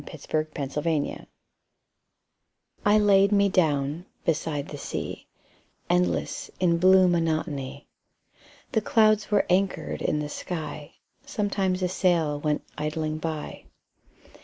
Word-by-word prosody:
7 -, -, -11 dB, 0.4 s
Autoplay 150 Hz, +1 st, -2 dB, 1.6 s
I 205 Hz, +1 st, +5 dB
laid 200 Hz, -1 st, +5 dB
me 200 Hz, -1 st, +4 dB
down 155 Hz, -2 st, 0 dB, 0.2 s
beside 150 Hz, -2 st, -1 dB
the 145 Hz, -, -6 dB
sea, -, -, -5 dB, 0.6 s
Endless 90 Hz, -2 st, 0 dB
in 170 Hz, -2 st, +2 dB
blue 185 Hz, +1 st, +6 dB
monotony; 155 Hz, -5 st, -1 dB, 0.9 s
The 220 Hz, -, +1 dB
clouds 215 Hz, -1 st, +3 dB
were 205 Hz, -2 st, +3 dB
anchored 180 Hz, -3 st, 0 dB
in 150 Hz, -, 0 dB
the 150 Hz, 0 st, -2 dB
sky. 155 Hz, -2 st, -6 dB, 0.3 s
Sometimes 200 Hz, -8 st, -1 dB
a -, -, +3 dB
sail 170 Hz, -5 st, +1 dB
went 150 Hz, 0 st, -1 dB, 0.2 s
idling 155 Hz, 0 st, -2 dB
by. 155 Hz, -2 st, -5 dB
165 Hz, 110 wpm, -26 LUFS, 150-190 Hz, 1.6 s, blue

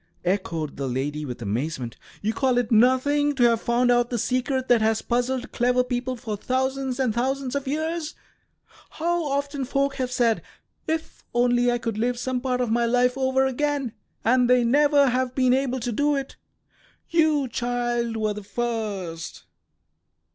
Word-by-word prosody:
echoed 170 Hz, -5 st, -2 dB
the 135 Hz, -1 st, -2 dB
lady, 145 Hz, +4 st, -2 dB
with 125 Hz, -3 st, -6 dB
amazement. 120 Hz, +3 st, -3 dB, 0.3 s
"You 220 Hz, +2 st, 0 dB
call 260 Hz, -1 st, +1 dB
it 245 Hz, -2 st, 0 dB
nothing 260 Hz, +5 st, +3 dB
to 255 Hz, -, +2 dB
have 230 Hz, -1 st, +4 dB
found 245 Hz, +1 st, +2 dB
out 240 Hz, 0 st, +3 dB
the 240 Hz, -, -1 dB
secret 255 Hz, +3 st, -1 dB
that 240 Hz, -2 st, +4 dB
has 220 Hz, 0 st, +1 dB
puzzled 250 Hz, +1 st, -1 dB
clever 250 Hz, +1 st, +2 dB
people 250 Hz, 0 st, -2 dB
for 230 Hz, -3 st, -5 dB
thousands 260 Hz, +3 st, -1 dB
and 255 Hz, -5 st, +1 dB
thousands 260 Hz, +2 st, -1 dB
of 280 Hz, -1 st, -3 dB
years? 315 Hz, +2 st, -2 dB, 0.7 s
How 345 Hz, +1 st, -1 dB
often 280 Hz, -1 st, -2 dB
folk 275 Hz, +1 st, 0 dB
have 255 Hz, -1 st, -2 dB
said, 235 Hz, -3 st, +2 dB, 0.5 s
'If 320 Hz, 0 st, -3 dB
only 245 Hz, 0 st, +3 dB
I 240 Hz, -, +1 dB
could 230 Hz, -3 st, -3 dB
live 245 Hz, +2 st, 0 dB
some 250 Hz, 0 st, -2 dB
part 250 Hz, -1 st, -1 dB
of 240 Hz, -3 st, -1 dB
my 235 Hz, +1 st, +2 dB
life 250 Hz, +1 st, +2 dB
over 265 Hz, 0 st, +2 dB
again!' 275 Hz, -2 st, -1 dB, 0.3 s
and 250 Hz, +1 st, +4 dB
they 250 Hz, -1 st, +5 dB
never 285 Hz, +2 st, +4 dB
have 255 Hz, 0 st, -1 dB
been 255 Hz, -2 st, +3 dB
able 260 Hz, -1 st, 0 dB
to 240 Hz, +1 st, -2 dB
do 290 Hz, +5 st, +1 dB
it. 275 Hz, -1 st, -4 dB, 0.8 s
You, 310 Hz, -4 st, +3 dB
child, 240 Hz, -1 st, -1 dB
were 215 Hz, -1 st, 0 dB
the 210 Hz, -, -7 dB
first." 200 Hz, -7 st, -4 dB
250 Hz, 170 wpm, -24 LUFS, 230-270 Hz, 0.8 s, they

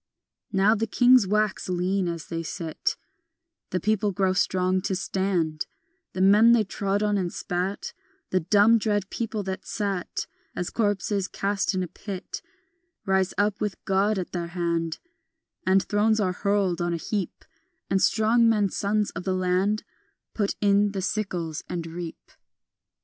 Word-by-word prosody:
Now 200 Hz, +2 st, +4 dB
the 225 Hz, 0 st, -1 dB
kings 245 Hz, -1 st, +5 dB
wax 210 Hz, -1 st, 0 dB
lean 185 Hz, +1 st, 0 dB
as 170 Hz, -2 st, -4 dB
they 165 Hz, -1 st, -4 dB
sit, 165 Hz, 0 st, -3 dB, 0.7 s
The 185 Hz, -, -1 dB
people 210 Hz, +2 st, +1 dB
grow 190 Hz, 0 st, +1 dB
strong 185 Hz, 0 st, +1 dB
to 190 Hz, 0 st, -1 dB
stand; 180 Hz, -5 st, -1 dB, 0.5 s
The 185 Hz, -, -2 dB
men 210 Hz, +5 st, +7 dB
they 230 Hz, -2 st, +4 dB
trod 200 Hz, +1 st, -1 dB
on 210 Hz, -1 st, +2 dB
and 175 Hz, -2 st, -2 dB
spat, 180 Hz, +3 st, -3 dB, 0.4 s
The 185 Hz, -, +3 dB
dumb 205 Hz, +6 st, +5 dB
dread 205 Hz, -2 st, -1 dB
people 225 Hz, -2 st, -3 dB
that 190 Hz, 0 st, -4 dB
sat 200 Hz, -4 st, -2 dB, 0.3 s
As 175 Hz, -, -3 dB
corpses 205 Hz, -2 st, 0 dB
cast 200 Hz, 0 st, -1 dB
in 185 Hz, -, 0 dB
a -, -, -4 dB
pit, 190 Hz, +2 st, -7 dB, 0.6 s
Rise 190 Hz, -1 st, +1 dB
up 205 Hz, 0 st, +1 dB
with 210 Hz, -3 st, -1 dB
God 195 Hz, +2 st, +2 dB
at 185 Hz, -, -4 dB
their 170 Hz, -2 st, -3 dB
hand, 170 Hz, -2 st, -1 dB, 0.7 s
And 190 Hz, +1 st, +4 dB
thrones 215 Hz, +3 st, +2 dB
are 185 Hz, -3 st, +1 dB
hurled 200 Hz, -3 st, 0 dB
on 175 Hz, 0 st, 0 dB
a -, -, -2 dB
heap, 195 Hz, +3 st, -4 dB, 0.4 s
And 190 Hz, 0 st, +1 dB
strong 230 Hz, +1 st, +4 dB
men, 210 Hz, -3 st, +2 dB
sons 205 Hz, +2 st, 0 dB
of 180 Hz, -, -6 dB
the 185 Hz, 0 st, 0 dB
land, 185 Hz, +3 st, +1 dB, 0.5 s
Put 205 Hz, -2 st, -1 dB
in 200 Hz, 0 st, +3 dB
the 190 Hz, -2 st, -3 dB
sickles 180 Hz, -6 st, -2 dB
and 170 Hz, -2 st, -3 dB
reap. 165 Hz, 0 st, -8 dB
195 Hz, 155 wpm, -26 LUFS, 180-210 Hz, 0.7 s, men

